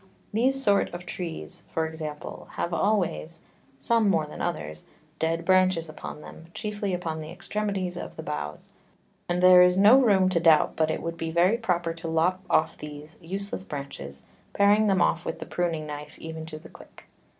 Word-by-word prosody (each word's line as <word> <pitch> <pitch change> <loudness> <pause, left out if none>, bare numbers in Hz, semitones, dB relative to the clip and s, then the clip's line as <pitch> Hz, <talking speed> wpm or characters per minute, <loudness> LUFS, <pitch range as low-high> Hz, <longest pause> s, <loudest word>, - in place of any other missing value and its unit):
These 265 +5 +2
sort 200 -3 +3
of 175 +1 -8
Trees, 170 -2 -6
for 160 - 0
example, 155 -2 -7
have 170 - -3
always 180 - 0 0.4
(some 220 +9 +2
more 165 -5 +2
than 150 - -9
others) 80 - -4 0.3
dead 165 +1 -1
Branches 185 -3 +3
upon 155 0 -8
them, 160 +1 -12
chiefly 210 -2 -3
upon 165 -3 -4
the 155 0 -7
Extremities 190 0 -3
of - - -7
the - - -7
Boughs; 75 0 -6 0.6
and 175 +1 0
there 185 0 +9
is 180 0 +5
no 210 +7 +8
room 195 -6 +4
to 180 -2 +1
doubt 160 -2 +4
but 160 -1 +1
it - - -2
would 165 0 -4
be 165 0 -3
very 175 +6 +3
proper 175 -7 -1
to 165 0 -7
lop 165 +3 +1
off 155 - +2
these 150 +1 -9
useless 195 +3 -4
Branches, 105 - -7 0.3
paring 205 +2 +4
them 190 -3 +3
off 170 +1 +1
with - - -4
the - - -7
pruning 165 -3 -2
Knife 150 0 -8
even 160 0 -7
to 155 -1 -7
the 155 - -13
Quick. - - -16
170 Hz, 185 wpm, -26 LUFS, 160-190 Hz, 0.6 s, there